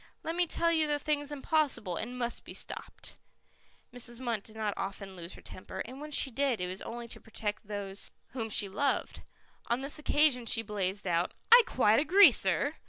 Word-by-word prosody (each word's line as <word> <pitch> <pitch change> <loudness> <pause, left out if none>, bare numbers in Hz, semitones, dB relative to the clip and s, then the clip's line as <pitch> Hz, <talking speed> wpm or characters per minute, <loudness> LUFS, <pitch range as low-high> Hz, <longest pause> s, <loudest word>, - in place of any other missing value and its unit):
Let 325 - -3
me 350 0 +2
tell 335 +1 +2
you 320 -2 +2
the 295 0 +1
thing's 290 0 -1
impossible, 285 - 0
and 245 +7 -5
must 240 -1 -3
be - - -10
stopped." - - -4 0.8
Mrs. 240 -1 -4
Munt 235 -5 -2
did 215 +2 -15
not 215 -2 -1
often 195 0 -5
lose 175 0 -8
her - - -14
temper, 185 - -7
and 260 +4 -9
when 300 - -6
she 275 -2 +2
did 265 -1 0
it 180 - -1
was 185 +2 -5
only 235 0 -6
to - - -10
protect 210 -2 -4
those 200 -1 -4 0.2
whom 230 -3 -4
she 205 -1 +4
loved. 235 +9 -1 0.5
On 240 +2 0
this 280 +3 -1
occasion 295 -5 +3
she 225 0 +2
blazed 200 -2 -3
out. 175 -1 0 0.2
"I 480 +1 +11
quite 220 -3 +4
agree, 365 +7 +7
sir. - - +1
235 Hz, 195 wpm, -31 LUFS, 205-290 Hz, 0.8 s, I